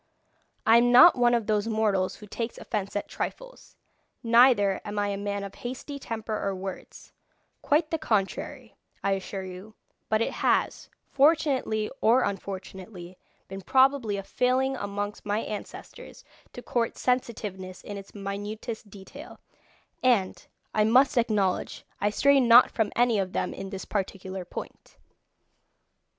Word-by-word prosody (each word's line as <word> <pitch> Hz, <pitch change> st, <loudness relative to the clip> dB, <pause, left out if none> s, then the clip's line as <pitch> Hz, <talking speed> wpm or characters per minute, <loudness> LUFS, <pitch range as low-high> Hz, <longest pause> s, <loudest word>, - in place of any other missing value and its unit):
I 225 Hz, +1 st, +7 dB
am 245 Hz, +1 st, +4 dB
not 320 Hz, +8 st, +9 dB
one 240 Hz, -1 st, +3 dB
of 230 Hz, -2 st, -1 dB
those 210 Hz, 0 st, 0 dB
mortals 215 Hz, -4 st, 0 dB
who 210 Hz, -, -12 dB
takes 230 Hz, +3 st, -5 dB
offence 205 Hz, -2 st, -4 dB
at 205 Hz, -, -2 dB
trifles, -, -, -7 dB, 0.5 s
neither 230 Hz, -4 st, +4 dB
am 205 Hz, 0 st, -6 dB
I 205 Hz, 0 st, 0 dB
a 200 Hz, -, -2 dB
man 200 Hz, 0 st, -3 dB
of 200 Hz, 0 st, -7 dB
hasty 260 Hz, +3 st, -7 dB
temper 225 Hz, -3 st, -4 dB
or 195 Hz, -1 st, -1 dB
words 190 Hz, 0 st, -9 dB, 0.5 s
quite 305 Hz, +2 st, +1 dB
the 325 Hz, -, -1 dB
contrary, 215 Hz, -10 st, -2 dB, 0.3 s
I 200 Hz, -, +1 dB
assure 195 Hz, 0 st, -3 dB
you; 185 Hz, +4 st, -10 dB, 0.3 s
but 215 Hz, -, +2 dB
it 230 Hz, -, 0 dB
has, -, -, 0 dB, 0.2 s
fortunately 275 Hz, -7 st, +2 dB
or 245 Hz, +4 st, +4 dB
unfortunately, 190 Hz, -2 st, -6 dB, 0.3 s
been 195 Hz, 0 st, -8 dB
probably 260 Hz, -3 st, +2 dB
a 195 Hz, -, -5 dB
failing 255 Hz, +5 st, 0 dB
amongst 205 Hz, -2 st, -5 dB
my 210 Hz, +1 st, -1 dB
ancestors 210 Hz, -2 st, -9 dB, 0.3 s
to 245 Hz, -, -9 dB
court 235 Hz, -2 st, -1 dB
sensitiveness 210 Hz, -7 st, -3 dB
in 205 Hz, -, -7 dB
its 195 Hz, +1 st, -11 dB
minutest 205 Hz, +2 st, -6 dB
detail, 195 Hz, -1 st, -12 dB, 0.6 s
and, 230 Hz, -7 st, +1 dB, 0.3 s
I 215 Hz, -, +3 dB
must 250 Hz, +5 st, +4 dB
acknowledge, 210 Hz, -6 st, 0 dB
I 205 Hz, -, +1 dB
stray 280 Hz, +6 st, +4 dB
not 240 Hz, -1 st, +7 dB
from 220 Hz, -3 st, -1 dB
any 240 Hz, -3 st, +3 dB
of 190 Hz, -1 st, -3 dB
them -, -, -2 dB
in 195 Hz, -, -7 dB
this 195 Hz, -1 st, -7 dB
particular 190 Hz, -2 st, -4 dB
point. -, -, -9 dB
215 Hz, 145 wpm, -27 LUFS, 195-245 Hz, 0.6 s, not